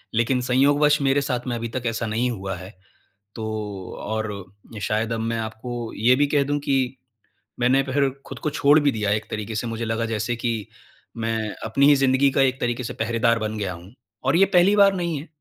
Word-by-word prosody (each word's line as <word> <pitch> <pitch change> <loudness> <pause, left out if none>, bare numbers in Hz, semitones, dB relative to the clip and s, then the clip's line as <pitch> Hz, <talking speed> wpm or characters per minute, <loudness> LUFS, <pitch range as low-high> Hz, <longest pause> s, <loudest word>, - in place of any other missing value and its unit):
लेकिन 120 +3 +2
संयोगवश 145 +4 +3
मेरे 135 +1 +2
साथ 125 -2 -3
में 120 - -1
अभी 115 0 -3
तक 130 - -2
ऐसा 115 0 -2
नहीं 115 +3 0
हुआ 95 -4 -4
है, 95 +4 -10 0.6
तो 110 - -5 0.6
और 110 0 -2 0.5
शायद 110 +2 -1
अब 115 - -2
मैं 115 +1 -1
आपको 115 +1 -5
ये 120 +4 +4
भी 145 - +4
कह 145 0 +2
दूँ 145 +1 -1
कि, 140 -1 +1 0.8
मैंने 125 +2 +4
फिर 140 +1 +1 0.2
खुद 135 - -8
को - - +3
छोड़ 145 0 +4
भी 145 -1 +2
दिया 105 -3 -2
एक 110 +1 0
तरीके 110 +1 -4
से 115 +3 -2
मुझे 115 0 -3
लगा 115 +1 -1
जैसे 115 +1 -2
कि 120 0 -1 0.7
मैं 115 -1 -1 0.2
अपनी 135 +6 +3
ही 145 - +7
ज़िंदगी 135 0 +3
का - - +5
एक 130 -1 +2
तरीके 120 +1 -1
से 115 - -5
पहरेदार 115 +1 +1
बन 110 0 -3
गया 100 -3 -2
हूँ। 90 +4 -13 0.3
और 135 +3 +2
ये 195 - +6
पहली 180 +4 +5
बार 200 -1 +6
नहीं 170 -3 -2
है, 150 - -10
120 Hz, 210 wpm, -23 LUFS, 110-140 Hz, 0.8 s, ही